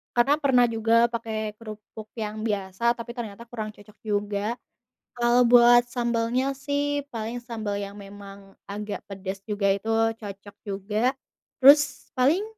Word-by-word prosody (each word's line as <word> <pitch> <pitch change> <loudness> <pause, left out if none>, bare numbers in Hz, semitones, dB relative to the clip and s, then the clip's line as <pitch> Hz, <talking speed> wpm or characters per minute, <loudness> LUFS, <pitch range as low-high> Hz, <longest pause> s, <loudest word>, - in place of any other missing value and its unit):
Karena 260 +4 +4
pernah 255 -4 +4
juga 230 +1 +3
pakai 220 -2 -3
kerupuk 215 -1 -10
yang 215 -1 -4
biasa 205 +3 0
tapi 235 0 -7
ternyata 225 -1 -6
kurang 215 -3 -5
cocok 205 +1 -18
juga. 205 +1 -1 0.6
Kalau 240 0 +4
buat 240 0 +8
sambalnya 240 +2 0
sih, 285 +1 -1
paling 230 0 -5
sambal 225 -4 -5
yang 200 0 -7
memang 200 -1 -12 0.2
agak 205 +1 -5
pedes 195 0 -6
juga, 205 -2 +2
itu 200 +3 -4 0.3
cocok 200 -1 -9 0.2
juga. 210 +6 -1 0.4
Terus 290 +2 +5
paling, 285 +10 +2
225 Hz, 135 wpm, -25 LUFS, 205-240 Hz, 0.6 s, buat